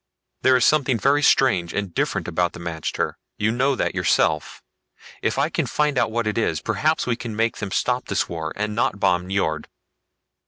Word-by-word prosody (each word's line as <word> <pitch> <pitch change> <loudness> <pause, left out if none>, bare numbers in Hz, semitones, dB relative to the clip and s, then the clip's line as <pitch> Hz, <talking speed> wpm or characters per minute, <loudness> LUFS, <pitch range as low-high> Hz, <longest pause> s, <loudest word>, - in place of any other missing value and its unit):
There 130 0 +5
is 125 - +3
something 135 -5 +3
very 140 +5 +2
strange 120 -12 +3
and 100 -4 -3
different - - -1
about 90 0 0
the - - -9
magter, 85 -2 -3 0.2
you 110 +1 +1
know 135 +4 +1
that - - -1
yourself. 75 -1 0 0.6
If - - -1
I - - +2
can - - -1
find 150 -1 0
out 125 - +2
what 115 +1 -1
it 105 +1 0
is, 115 - 0
perhaps 150 +9 0
we 125 - 0
can 115 -2 -6
make 115 +1 0
them 100 - -4
stop 125 +6 0
this 100 - 0
war, 80 -2 -4
and 105 +1 -2
not 105 -2 0
bomb 90 -2 +1
Nyjord." 85 -5 -1
105 Hz, 195 wpm, -23 LUFS, 90-125 Hz, 0.6 s, There